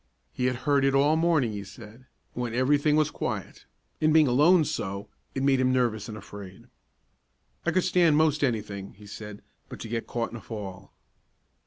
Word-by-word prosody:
He 125 - -1
had 125 0 +1
heard 140 -2 +3
it 135 0 +3
all 140 +2 +4
the 160 +1 +2
morning 160 -9 +2
he 100 -1 -5
said, 110 +5 -13 0.3
when 120 -2 -3
every 130 +3 +3
thing 150 +1 +2
was 155 -1 +2
quiet, 100 -7 -5 0.4
and, 155 0 +4
being 155 -1 +6
alone 155 +7 +5
so, 100 -5 -4 0.3
it 135 - -1
made 135 -1 +3
him 130 0 +3
nervous 120 -4 0
and 110 - -6
afraid. 100 -3 -11 1.0
"I - - +4
could 185 - +2
stan' 175 -4 +4
most 155 -1 +2
any 120 -5 +1
thing," 100 -2 -8
he 105 +1 -15
said, 105 0 -9 0.3
"but - - -9
to - - -6
get 115 0 -3
caught 120 -1 -2
in 120 - -6
a - - -11
'fall. 100 -4 -8
125 Hz, 200 wpm, -27 LUFS, 105-145 Hz, 1.0 s, being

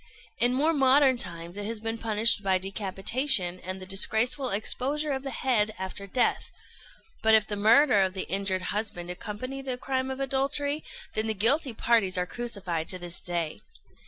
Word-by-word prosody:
In 245 +1 +3
more 305 +5 +2
modern 270 -1 +5
times 170 -1 -2
it 205 0 -4
has 225 -1 -3
been 225 +1 -4
punished 220 0 +2
by 190 -2 +2
decapitation 195 +1 0
and 185 +1 -6
the 185 - -8
disgraceful 220 +7 +1
exposure 280 +8 -1
of 265 -1 -2
the 275 - -5
head 225 -4 0
after 190 +1 -6
death; 245 +5 0 0.7
but 220 0 +5
if 215 -1 +4
the 210 - -4
murder 220 +2 +5
of 190 0 0
the 190 - -3
injured 190 -1 -1
husband 205 -5 -3
accompany 225 +9 -6
the 260 -2 -3
crime 260 0 -2
of 265 0 -5
adultery, 280 +2 -1 0.3
then 215 +1 +1
the 220 - -1
guilty 245 - +2
parties 220 -6 +2
are 180 - 0
crucified 190 -7 -3
to 185 - +2
this 175 -1 -8
day. 170 -3 -3
220 Hz, 175 wpm, -27 LUFS, 190-260 Hz, 0.7 s, modern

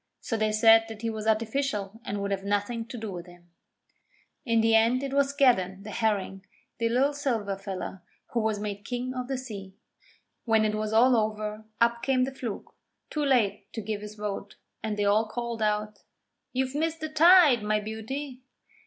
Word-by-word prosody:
So 230 - -3
they 215 -1 +1
said 225 +1 +6
that 220 0 -9
he 230 - 0
was 220 0 -5
artificial 220 -1 -1
and 205 -2 -3
would 200 0 -2
have 195 -1 -2
nothing 205 +3 -1
to 245 - -7
do 220 -2 -5
with 175 -1 -7
him. 175 -1 -17 1.0
In 230 -1 +3
the 225 0 +3
end 230 +4 +4
it 275 -1 -3
was 280 0 +3
Skeddan, 200 -9 +2
the 210 - -7
Herring, 200 -4 -1 0.4
the 230 0 +1
Lil 265 +5 +2
Silver 230 -9 -1
Fella, 195 -1 -6 0.3
who 240 - 0
was 220 -2 0
made 205 -1 -5
King 250 +3 -3
of 250 -1 -4
the 265 -1 -2
Sea. 200 -7 -8 0.7
When 220 -2 +3
it 215 - 0
was 215 0 -2
all 245 +3 +5
over, 215 -1 -2
up 235 0 +2
came 255 0 +2
the 265 +1 -2
Fluke, 240 -6 -6 0.4
too 300 - -1
late 250 -8 +1
to 225 - -4
give 210 0 -3
his 210 0 -8
vote, 205 -1 -5 0.3
and 215 -1 -3
they 205 - +1
all 215 +2 +3
called 235 0 -4
out: 210 0 -1 0.5
'You've 260 +1 -1
missed 325 +2 -1
the 315 - -3
tide, 315 - +7
my 210 0 +1
beauty!' 250 +6 -6
220 Hz, 190 wpm, -27 LUFS, 210-250 Hz, 1.0 s, tide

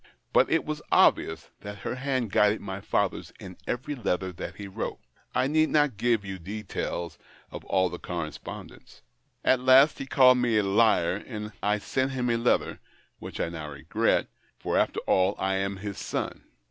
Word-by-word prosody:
But - - +5
it 165 - +2
was 155 0 -4
obvious 80 0 +3
that 100 0 -8
her - - -1
hand 130 -4 -2
guided 105 +2 +3
my 95 -1 -6
father's - - -1
in 90 -1 -9
every 130 +4 -2
letter 95 -7 -2
that 85 - -7
he 100 - -7
wrote. 95 - -4 0.4
I - - +3
need 155 +3 +2
not 145 -5 +2
give 115 -2 +1
you 95 -1 -6
details 90 -3 -5 0.3
of - - -8
all 95 -1 +2
the 90 0 -7
correspondence. 85 -4 -7 0.4
At 130 - +4
last 130 +4 +6
he 135 - -5
called 125 -2 +6
me 120 -3 +2
a 105 - +3
liar, 100 -3 +3
and 105 -3 -6
I 105 +1 +2
sent 130 +5 -1
him 125 -2 0
a 115 - +2
letter, 115 +1 +1 0.4
which - - -8
I - - 0
now 80 -3 -6
regret 70 - 0 0.2
— - - -38
for, - - -2
after - - +1
all, 95 +2 +2
I 95 0 0
am 100 0 -2
his 100 0 -6
son. - - -4
105 Hz, 185 wpm, -27 LUFS, 95-130 Hz, 0.4 s, last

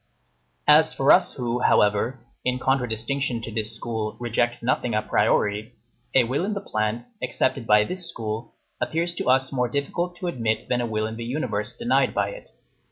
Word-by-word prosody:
As 155 +1 +6
for 135 - +4
us, 180 -1 +5
who, 120 -2 -2
however, 105 +2 +3 0.3
in 125 0 0
contradistinction 125 0 -1
to 115 - -5
this 110 0 -2
school, 110 -2 -4
reject 120 0 0
nothing 120 -1 0
a 110 - +1
priori, 105 +1 +1 0.4
a 130 - +7
will 130 +8 -1
in 205 +2 -1
the - - -1
plant, 110 - -2 0.2
accepted 125 -2 -1
by 105 0 +6
this 180 +6 -3
school, 110 -6 -5 0.3
appears 170 +2 0
to - - -4
us 130 +1 +3
more 125 -3 0
difficult 170 +7 -2
to 180 - -7
admit 115 -10 -1
than 125 -1 +1
a 120 - -1
will 110 -1 -1
in 110 +1 -5
the 115 - -5
universe 115 -4 -2
denied 235 +1 +2
by - - +1
it. - - -10
120 Hz, 180 wpm, -24 LUFS, 110-140 Hz, 0.4 s, a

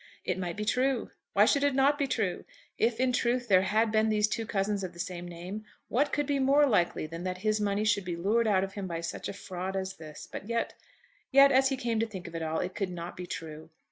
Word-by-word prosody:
It 185 0 -1
might 175 -1 -3
be 210 - -2
true. 255 +2 +1 0.2
Why 205 +2 +6
should 280 +5 +3
it 285 -2 +2
not 280 +2 +3
be 280 - +1
true? 210 -8 -1 0.4
If 230 +1 +2
in 255 0 +2
truth 245 0 +1
there 185 -3 +6
had 215 +4 +2
been 220 0 +3
these 210 -1 +3
two 225 +1 -3
cousins 200 -1 0
of 180 -1 -5
the 175 - -14
same 175 0 -4
name, 180 +5 -7 0.3
what 285 +5 +2
could 290 0 0
be 280 0 0
more 280 +2 +5
likely 180 - +1
than 165 +2 -7
that 185 0 -2
his 215 0 +2
money 205 0 +1
should 210 -3 +2
be 175 -1 -2
lured 215 +7 +1
out 190 -3 +3
of 195 0 -4
him 195 -2 -4
by 170 -1 -3
such 170 - -4
a - - -4
fraud 190 -1 -5
as 190 0 -3
this? 155 -2 -10
But 200 - -7
yet, 235 0 -1 0.6
yet, 275 0 +7
as 265 0 +5
he 270 - -1
came 235 -3 -1
to 225 - +1
think 190 -4 -8
of 170 - -10
it 165 - -4
all, 160 0 -1
it 180 +1 -3
could 195 -1 -2
not 175 -1 -6
be 180 0 -7
true. 160 -1 -7
205 Hz, 260 wpm, -29 LUFS, 180-235 Hz, 0.6 s, yet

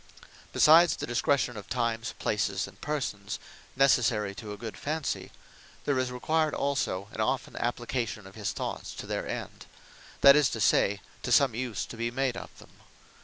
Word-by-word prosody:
Besides 165 +3 +6
the - - -4
Discretion 120 +1 +1
of 105 - -9
times, 115 -1 -1
places, 100 -2 -1
and 95 0 -16
persons, 120 -9 -3 0.4
necessary 120 -6 +3
to 105 +1 -8
a 105 - -6
good 110 +1 -6
Fancy, 155 0 -3 0.5
there 140 -3 +1
is 130 -1 -1
required 155 +5 0
also 130 -9 -1
an - - -4
often - - -1
application 120 -3 -2
of 95 - -12
his 105 -2 -3
thoughts - - -5
to - - -7
their - - -3
End; - - -6 0.5
that 140 0 +9
is 150 -3 +4
to 115 - -4
say, 100 0 +3 0.2
to 125 - -3
some 130 0 +5
use 120 -1 -3
to 115 - -10
be 115 +1 -1
made 130 0 -1
of - - -7
them. - - -15
120 Hz, 170 wpm, -29 LUFS, 105-135 Hz, 0.5 s, that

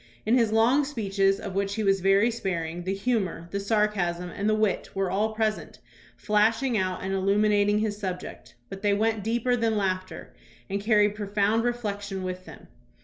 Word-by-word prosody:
In 225 +3 +3
his 230 -4 +3
long 235 +6 +4
speeches, 195 -7 0
of 195 - -6
which 200 +1 -1
he 220 - -2
was 195 -1 +3
very 195 +5 +4
sparing, 175 -6 -4
the 190 - -1
humor, 195 -6 -2
the 200 - -2
sarcasm, 195 -4 0
and 205 +4 -1
the 215 - +3
wit 215 -2 0
were 195 -2 -1
all 215 +3 0
present, 215 -1 -2 0.4
flashing 225 +4 +1
out 185 -3 -1
and 190 +1 -2
illuminating 205 +1 +2
his 210 -1 -1
subject, 185 -3 -6
but 195 0 -9
they 205 -1 +2
went 220 0 0
deeper 235 +3 +1
than 225 -2 0
laughter, 185 -2 -3 0.4
and 200 +1 -1
carried 210 -1 +3
profound 210 +1 0
reflection 205 -5 -3
with 185 0 -5
them. - - -13
205 Hz, 175 wpm, -26 LUFS, 195-220 Hz, 0.4 s, long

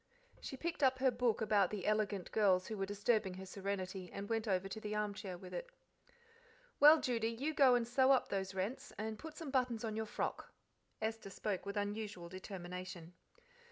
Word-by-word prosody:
She 265 - -6
picked 335 +3 -3
up 260 -1 +4
her 260 0 +3
book 235 -2 +1
about 205 -4 +3
the 205 -4 -4
elegant 210 -3 0
girls 190 -4 +4
who 220 - -4
were 195 -1 -2
disturbing 205 -1 +1
her 190 +1 -7
serenity 190 -1 -4
and 200 0 -5
went 225 0 -1
over 190 -1 +1
to 195 - -5
the 210 0 -3
armchair 205 -3 -3
with 180 +1 -10
it. - - -4 1.1
"Well, 305 +2 +9
Judy, 230 -4 0
you 260 +7 -2
go 270 -4 +6
and 235 -1 +1
sew 260 +2 +4
up 265 - +3
those 190 -1 -2
rents, 195 +7 -3
and 215 +1 -4
put 320 -1 -8
some 315 -5 -5
buttons 250 -4 +1
on 220 -2 -2
your 220 0 -2
frock." - - -3 0.5
Esther 220 -2 -2
spoke 195 0 -3
with 200 +1 -3
unusual 205 -3 -3
determination. 180 -2 -7
210 Hz, 190 wpm, -37 LUFS, 190-240 Hz, 1.1 s, Well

